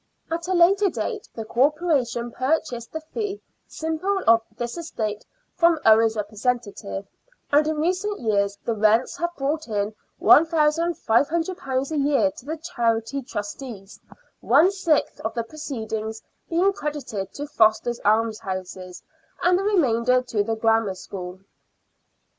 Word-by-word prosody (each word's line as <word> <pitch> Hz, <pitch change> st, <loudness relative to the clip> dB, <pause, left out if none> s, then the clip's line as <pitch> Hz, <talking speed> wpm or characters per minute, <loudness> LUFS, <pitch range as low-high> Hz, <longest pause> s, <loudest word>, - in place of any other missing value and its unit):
At 335 Hz, +1 st, -2 dB
a 375 Hz, -, +1 dB
later 385 Hz, +4 st, +5 dB
date 430 Hz, +3 st, -4 dB
the 225 Hz, -, -5 dB
Corporation 260 Hz, -2 st, +1 dB
purchased 255 Hz, -3 st, -1 dB
the 315 Hz, -, -5 dB
fee 415 Hz, -3 st, -3 dB, 0.3 s
simple 345 Hz, +5 st, -2 dB
of 230 Hz, 0 st, +6 dB, 0.2 s
this 240 Hz, 0 st, -4 dB
estate 220 Hz, -11 st, -4 dB, 0.3 s
from 340 Hz, -1 st, +4 dB
Owen's 220 Hz, 0 st, +5 dB
representative, 210 Hz, -1 st, -3 dB, 0.5 s
and 295 Hz, +1 st, +4 dB
in 315 Hz, -, 0 dB
recent 370 Hz, +6 st, -1 dB
years 200 Hz, -3 st, 0 dB
the 230 Hz, -, 0 dB
rents 220 Hz, +3 st, +2 dB
have 345 Hz, -, -1 dB
brought 290 Hz, +2 st, -2 dB
in 210 Hz, -1 st, -1 dB, 0.3 s
£1,500 315 Hz, -2 st, +2 dB
a 310 Hz, -, -1 dB
year 285 Hz, 0 st, +2 dB
to 255 Hz, -, -14 dB
the 320 Hz, +2 st, -3 dB
Charity 240 Hz, -5 st, -1 dB
Trustees, 210 Hz, -3 st, -7 dB, 0.4 s
one 300 Hz, +10 st, +4 dB
sixth 360 Hz, -6 st, 0 dB
of 220 Hz, +2 st, -4 dB
the 235 Hz, -, -1 dB
proceeds 220 Hz, -6 st, -5 dB, 0.3 s
being 365 Hz, +4 st, +2 dB
credited 280 Hz, -, -4 dB
to 290 Hz, -, -4 dB
Foster's 235 Hz, -3 st, +2 dB
Almshouses 190 Hz, -4 st, -1 dB, 0.4 s
and 360 Hz, +1 st, +4 dB
the -, -, -2 dB
remainder 255 Hz, -, +2 dB
to 220 Hz, -4 st, -1 dB
the 225 Hz, +2 st, -2 dB
Grammar 225 Hz, -3 st, +2 dB
School. 185 Hz, 0 st, -8 dB
255 Hz, 130 wpm, -24 LUFS, 220-320 Hz, 0.5 s, of